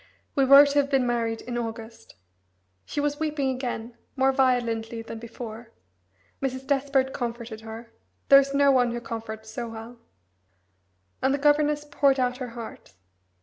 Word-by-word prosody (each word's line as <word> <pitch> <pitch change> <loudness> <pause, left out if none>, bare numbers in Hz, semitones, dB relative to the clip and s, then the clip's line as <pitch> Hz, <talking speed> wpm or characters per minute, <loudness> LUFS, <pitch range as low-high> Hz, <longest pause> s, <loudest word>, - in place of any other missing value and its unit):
We 275 - +3
were 275 +2 +9
to 285 0 +2
have 280 -1 +1
been 270 -3 +2
married 230 -2 -1
in 240 -1 -4
August." 225 0 -7 0.7
She - - -4
was 290 0 -1
weeping 295 -4 0
again, 245 -2 -4 0.2
more 265 0 +3
violently 235 -4 0
than 225 0 -8
before; 230 0 -9 0.7
Mrs. 260 -1 -3
Despard 270 -1 +1
comforted 235 -2 -5
her 225 +1 -10 0.4
there 275 - +10
is 275 0 -1
no 280 0 +4
one 245 -3 +3
who 240 - -3
comforts 220 -2 -7
so 235 +1 -5
well 225 +2 -9 1.2
and 265 +1 +2
the - - -2
governess 295 +1 +2
poured 280 -2 +2
out 250 0 0
her 255 -2 -5
heart. 230 - -9
250 Hz, 155 wpm, -26 LUFS, 230-275 Hz, 1.2 s, there